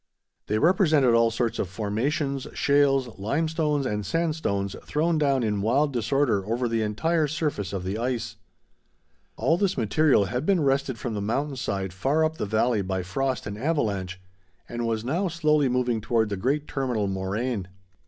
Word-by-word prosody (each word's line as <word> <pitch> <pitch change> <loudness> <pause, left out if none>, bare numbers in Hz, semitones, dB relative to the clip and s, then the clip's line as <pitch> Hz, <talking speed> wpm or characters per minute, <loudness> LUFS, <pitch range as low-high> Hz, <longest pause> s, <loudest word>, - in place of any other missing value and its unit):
They 105 - +1
represented 155 - +4
all 115 0 +4
sorts 115 0 -1
of 90 - -1
formations, 130 - -2
shales, 135 -5 +2
limestones, 150 +5 0
and 105 -4 -2
sandstones 100 - -1
thrown 160 +2 0
down 140 -4 +2
in 105 -2 0
wild 140 +7 +2
disorder 120 -3 +1
over 120 +5 -1
the 115 -1 0
entire 155 +10 +1
surface 145 - -2
of 95 -2 -3
the 95 +4 -3
ice. 120 -1 -2 1.0
All 165 - +2
this 195 -2 +1
material 130 0 +3
had 125 +7 -2
been 180 -2 +2
wrested 135 -2 +1
from 120 0 -4
the 105 - -3
mountain 135 +7 -1
side 95 -7 -3
far 145 +11 +1
up 160 0 -2
the - - -2
valley 110 +1 +1
by 95 -1 -2
frost 130 +9 -2
and 105 0 -6
avalanche, 100 - -1 0.5
and 120 0 -3
was 110 0 -2
now 170 +10 0
slowly 155 -4 +2
moving 125 -2 0
toward 115 0 +1
the 100 - -2
great 140 +9 -1
terminal 125 -6 -1
moraine. 95 +2 -2
125 Hz, 165 wpm, -26 LUFS, 105-150 Hz, 1.0 s, represented